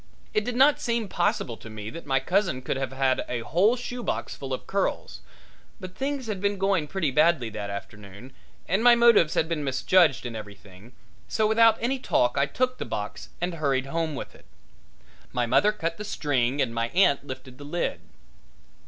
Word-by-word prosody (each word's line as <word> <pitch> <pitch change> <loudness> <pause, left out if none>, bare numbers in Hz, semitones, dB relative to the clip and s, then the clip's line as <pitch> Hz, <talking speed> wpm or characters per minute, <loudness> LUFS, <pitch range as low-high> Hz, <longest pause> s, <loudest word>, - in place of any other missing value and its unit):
It 215 - +1
did 245 +2 -3
not 275 +3 +5
seem 235 -2 -1
possible 150 -10 -1
to 115 - -11
me 110 0 -7
that 165 -2 -9
my 135 -1 +2
cousin 170 -3 0
could - - -2
have 135 -1 -3
had 130 -1 +1
a 120 -1 -2
whole 190 - +2
shoebox 245 -1 -4
full 135 -1 -7
of 130 - -4
curls, 195 0 -2 0.6
but 185 -2 -8
things 275 +3 -3
had 210 -4 -4
been 200 0 0
going 190 -5 +1
pretty 170 -4 -1
badly 145 -4 +3
that 105 -1 -5
afternoon 100 +4 -9 0.3
and 195 +6 +1
my 245 -1 +8
motives 235 -9 +5
had 160 - +2
been 160 -3 -2
misjudged 140 +2 +3
and 120 -2 -5
everything, 100 +1 -11 0.3
so 220 - 0
without 225 +1 +5
any 260 +3 -1
talk 125 - +1
I 140 0 +2
took 255 - -1
the - - -2
box 105 0 -6
and 175 +1 -2
hurried 140 -5 0
home 160 +1 -2
with - - -7
it. - - -19 0.9
My 125 -1 0
mother 205 - +4
cut 165 -5 -4
the 210 - -6
string 140 - 0
and 115 -3 -4
my 115 0 -1
aunt 145 -7 +3
lifted 130 -1 -9
the - - -9
lid. 145 - -3
155 Hz, 190 wpm, -26 LUFS, 125-205 Hz, 0.9 s, my